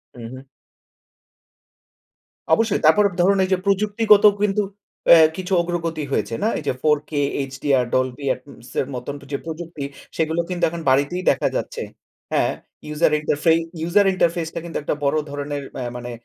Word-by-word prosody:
হু, -, -, -12 dB
হু। 130 Hz, +1 st, -11 dB, 2.1 s
অবশ্যই। 225 Hz, +2 st, +2 dB
তারপর 205 Hz, +7 st, +6 dB, 0.2 s
ধরুন 195 Hz, +2 st, +3 dB
এইযে 190 Hz, 0 st, +1 dB
প্রযুক্তিগত 210 Hz, +1 st, +3 dB, 0.2 s
কিন্তু 210 Hz, 0 st, +2 dB, 0.5 s
এ -, -, +9 dB, 0.2 s
কিছু 185 Hz, +1 st, -3 dB
অগ্রগতি 170 Hz, -3 st, -3 dB
হয়েছে, 115 Hz, -, -1 dB
না? -, -, +3 dB
এইযে 145 Hz, -3 st, -2 dB
4K, 150 Hz, 0 st, +1 dB, 0.4 s
HDR, 135 Hz, -2 st, +1 dB
Dolbi 130 Hz, +2 st, 0 dB
এপ্সের 130 Hz, -1 st, -6 dB
মত 125 Hz, -, -7 dB, 0.2 s
যে 140 Hz, -, 0 dB
প্রযুক্তি, 165 Hz, -2 st, -6 dB, 0.3 s
সেগুলো 160 Hz, +1 st, +1 dB
কিন্তু 180 Hz, -1 st, -3 dB
এখন 170 Hz, 0 st, -6 dB
বাড়িতেই 145 Hz, +8 st, +1 dB
দেখা -, -, 0 dB
যাচ্ছে। -, -, -3 dB, 0.5 s
হ্যাঁ, -, -, +2 dB, 0.4 s
ইউজার 150 Hz, +1 st, +1 dB
ইন্টারফে 150 Hz, +2 st, +1 dB, 0.4 s
user 200 Hz, +3 st, +4 dB
interface 170 Hz, -2 st, 0 dB
টা -, -, -1 dB
কিন্তু 170 Hz, -, -4 dB
একটা 150 Hz, -, -1 dB
বড় 140 Hz, +2 st, +2 dB
ধরনের 145 Hz, 0 st, -4 dB, 0.2 s
আ -, -, -2 dB
মানে 120 Hz, 0 st, -7 dB
160 Hz, 145 wpm, -21 LUFS, 140-185 Hz, 2.1 s, এ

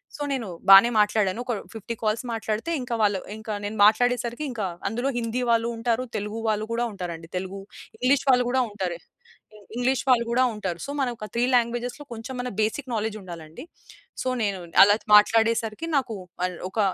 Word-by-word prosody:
So, -, -, -9 dB
నేను 255 Hz, -5 st, -2 dB, 0.2 s
బానే 195 Hz, +4 st, +10 dB
మాట్లాడాను. 210 Hz, 0 st, +1 dB
ఒక 245 Hz, -, -1 dB, 0.2 s
50 225 Hz, +1 st, -6 dB
కాల్స్ 220 Hz, +2 st, 0 dB
మాట్లాడితే 220 Hz, +6 st, -3 dB
ఇంకా 245 Hz, -1 st, -3 dB
వాళ్ళు 200 Hz, -2 st, +2 dB, 0.2 s
ఇంకా 220 Hz, 0 st, -5 dB
నేను 210 Hz, +2 st, -4 dB
మాట్లాడే 245 Hz, +4 st, +4 dB
సరికి 240 Hz, +5 st, -4 dB
ఇంకా 220 Hz, -5 st, -3 dB, 0.2 s
అందులో 245 Hz, +4 st, -1 dB
హిందీ 235 Hz, +1 st, -2 dB
వాళ్ళు 230 Hz, 0 st, +2 dB
ఉంటారు. 230 Hz, +1 st, 0 dB
తెలుగు 210 Hz, +2 st, -4 dB
వాళ్ళు 215 Hz, 0 st, 0 dB
గూడా 235 Hz, +1 st, 0 dB
ఉంటారండి. 170 Hz, -4 st, -6 dB
తెలుగు, 190 Hz, +2 st, -5 dB, 0.4 s
ఇంగ్లీష్ 265 Hz, +2 st, +3 dB
వాళ్ళు 250 Hz, -1 st, +5 dB
గూడా 260 Hz, +1 st, +2 dB
ఉంటారు. 190 Hz, -4 st, -4 dB, 0.8 s
ఇంగ్లీష్ 245 Hz, +2 st, +1 dB
వాళ్ళు 240 Hz, -2 st, +4 dB
గూడా 255 Hz, +2 st, +3 dB
ఉంటారు. 190 Hz, -5 st, -4 dB
సో, 280 Hz, -, -5 dB
మనకొక 240 Hz, -5 st, -3 dB
3 235 Hz, -, +1 dB
లాంగ్వేజెస్‌‌లో 240 Hz, +3 st, -1 dB
కొంచెం 235 Hz, +3 st, -7 dB
అన్న 250 Hz, -, -4 dB
బేసిక్ 255 Hz, +5 st, -2 dB
నాలెడ్జ్ 220 Hz, -1 st, -2 dB
ఉండాలండి. 165 Hz, -2 st, -10 dB, 0.6 s
సో, -, -, -3 dB, 0.2 s
నేను 200 Hz, -2 st, -1 dB, 0.2 s
అలా 205 Hz, +1 st, +6 dB, 0.2 s
మాట్లాడేసరికి 225 Hz, +4 st, +3 dB
నాకు 255 Hz, -5 st, -1 dB, 0.3 s
మల్ 180 Hz, -1 st, -1 dB
ఒక 220 Hz, -, -5 dB
225 Hz, 170 wpm, -25 LUFS, 205-245 Hz, 0.8 s, బానే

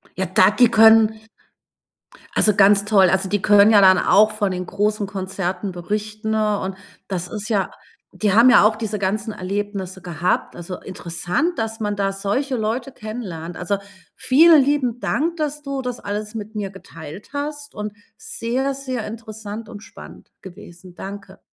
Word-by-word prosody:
Ja, 190 Hz, -, -1 dB
da 185 Hz, +1 st, +4 dB
die 240 Hz, +2 st, +4 dB
können 220 Hz, -1 st, +5 dB, 1.2 s
also, 210 Hz, -, +5 dB
ganz 200 Hz, 0 st, +5 dB
toll, 195 Hz, -4 st, +4 dB
also, 190 Hz, +1 st, 0 dB
die 205 Hz, 0 st, 0 dB
können 205 Hz, +1 st, +6 dB
ja 205 Hz, -, +6 dB
dann 185 Hz, -1 st, +7 dB
auch 215 Hz, +4 st, +4 dB
von 205 Hz, -2 st, -1 dB
den 180 Hz, 0 st, -4 dB
großen 210 Hz, +1 st, -1 dB
Konzerten 190 Hz, 0 st, -4 dB
berichten 215 Hz, +4 st, -4 dB
und 205 Hz, -3 st, -1 dB, 0.3 s
das 180 Hz, -2 st, -3 dB
ist 210 Hz, +3 st, -6 dB
ja 200 Hz, -4 st, 0 dB, 0.4 s
die 195 Hz, +2 st, 0 dB
haben 235 Hz, +4 st, +7 dB
ja 245 Hz, -, +7 dB
auch 215 Hz, 0 st, +3 dB
diese 215 Hz, -2 st, -3 dB
ganzen 210 Hz, +3 st, -2 dB
Erlebnisse 195 Hz, 0 st, -4 dB
gehabt. 175 Hz, 0 st, -2 dB
Also, 175 Hz, +1 st, -7 dB
interessant, 180 Hz, -, -3 dB
dass 225 Hz, 0 st, -3 dB
man 205 Hz, -1 st, -1 dB
da 195 Hz, -1 st, 0 dB
solche 210 Hz, +8 st, -2 dB
Leute 235 Hz, +4 st, -2 dB
kennenlernt. 185 Hz, -7 st, -7 dB
Also, 200 Hz, +3 st, -1 dB, 0.4 s
vielen 310 Hz, +2 st, +6 dB
lieben 260 Hz, -4 st, 0 dB
Dank, 320 Hz, +9 st, -1 dB
dass 300 Hz, -1 st, -3 dB
du 275 Hz, -1 st, -4 dB
das 250 Hz, -1 st, -5 dB
alles 210 Hz, +2 st, -5 dB
mit 215 Hz, 0 st, -7 dB
mir 205 Hz, -2 st, -3 dB
geteilt 175 Hz, -2 st, -11 dB
hast 290 Hz, 0 st, -5 dB
und 210 Hz, -1 st, -5 dB, 0.2 s
sehr, 255 Hz, +6 st, -3 dB
sehr 260 Hz, -4 st, -5 dB
interessant 220 Hz, -1 st, -8 dB
und 205 Hz, -3 st, -10 dB
spannend -, -, -14 dB
gewesen. 175 Hz, -1 st, -13 dB
Danke. 195 Hz, -1 st, -9 dB
210 Hz, 160 wpm, -21 LUFS, 190-225 Hz, 1.2 s, dann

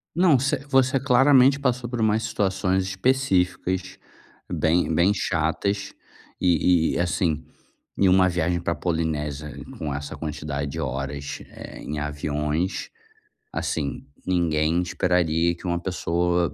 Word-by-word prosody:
Não, 170 Hz, -6 st, +5 dB
você 135 Hz, +3 st, +1 dB
você 135 Hz, 0 st, +3 dB
claramente 135 Hz, +1 st, +5 dB
passou 125 Hz, -3 st, -1 dB
por 120 Hz, -2 st, -3 dB
mais 110 Hz, +1 st, +2 dB
situações 95 Hz, -4 st, 0 dB
específicas 95 Hz, -4 st, 0 dB, 0.5 s
bem 80 Hz, 0 st, +1 dB
bem 85 Hz, +5 st, +4 dB
chatas 100 Hz, 0 st, -1 dB, 0.5 s
e 85 Hz, -1 st, +3 dB
e, -, -, -1 dB
assim, 85 Hz, -3 st, 0 dB, 0.5 s
em 100 Hz, -, +4 dB
uma 95 Hz, 0 st, +5 dB
viagem 85 Hz, 0 st, 0 dB
pra 85 Hz, 0 st, -1 dB
Polinésia 75 Hz, -4 st, -2 dB, 0.2 s
com 75 Hz, -3 st, -3 dB
essa 70 Hz, 0 st, -5 dB
quantidade 75 Hz, -2 st, -4 dB
de -, -, -5 dB
horas, 70 Hz, +2 st, -4 dB
eh, -, -, -10 dB
em 75 Hz, -, -5 dB
aviões, 75 Hz, +4 st, -2 dB, 0.6 s
assim, 70 Hz, -3 st, -3 dB, 0.2 s
ninguém 85 Hz, -2 st, +1 dB
esperaria 85 Hz, -1 st, +1 dB
que 85 Hz, -, -10 dB
uma 85 Hz, -, 0 dB
pessoa 90 Hz, -1 st, 0 dB
90 Hz, 125 wpm, -24 LUFS, 80-100 Hz, 0.6 s, Não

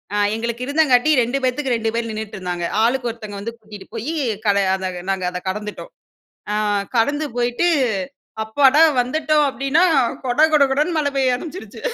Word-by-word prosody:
அ -, -, +1 dB, 0.2 s
எங்களுக்கு 235 Hz, +2 st, -3 dB
இருந்தங்காட்டி 285 Hz, -2 st, +3 dB
2 245 Hz, +3 st, -1 dB
பேத்துக்கு 255 Hz, +1 st, 0 dB
2 225 Hz, -1 st, -1 dB
பேர் 230 Hz, 0 st, -2 dB
நின்னுட்டு 215 Hz, -1 st, -6 dB
இருந்தாங்க. 180 Hz, -2 st, -3 dB, 0.2 s
ஆளுக்கு 245 Hz, +1 st, +1 dB
ஒருத்தங்க 215 Hz, -3 st, -8 dB
வந்து 220 Hz, +4 st, -5 dB
கூட்டிட்டு 215 Hz, -3 st, -12 dB
போயி, 240 Hz, +8 st, -3 dB, 0.3 s
கட 200 Hz, -1 st, +3 dB, 0.2 s
அத 190 Hz, -1 st, -4 dB, 0.2 s
நாங்க 190 Hz, -1 st, -1 dB
அதை 180 Hz, 0 st, -5 dB
கடந்துட்டோம். 210 Hz, -, -5 dB, 0.6 s
ஆ -, -, 0 dB, 0.4 s
கடந்து 290 Hz, +6 st, +1 dB
போயிட்டு, 245 Hz, +8 st, +1 dB, 0.8 s
அப்பாடா! 270 Hz, +6 st, +4 dB, 0.2 s
வந்துவிட்டோம் 300 Hz, +4 st, +1 dB
அப்பிடின்னா, 275 Hz, +5 st, +1 dB, 0.4 s
கொட 245 Hz, +2 st, 0 dB
கொட 295 Hz, -2 st, +6 dB
கொடன்னு 295 Hz, +6 st, +1 dB
மழை 290 Hz, -2 st, +1 dB
பெய்ய 265 Hz, -2 st, +2 dB
ஆரம்பிச்சுருச்சு. 330 Hz, +7 st, -9 dB
245 Hz, 155 wpm, -20 LUFS, 215-285 Hz, 0.8 s, கொட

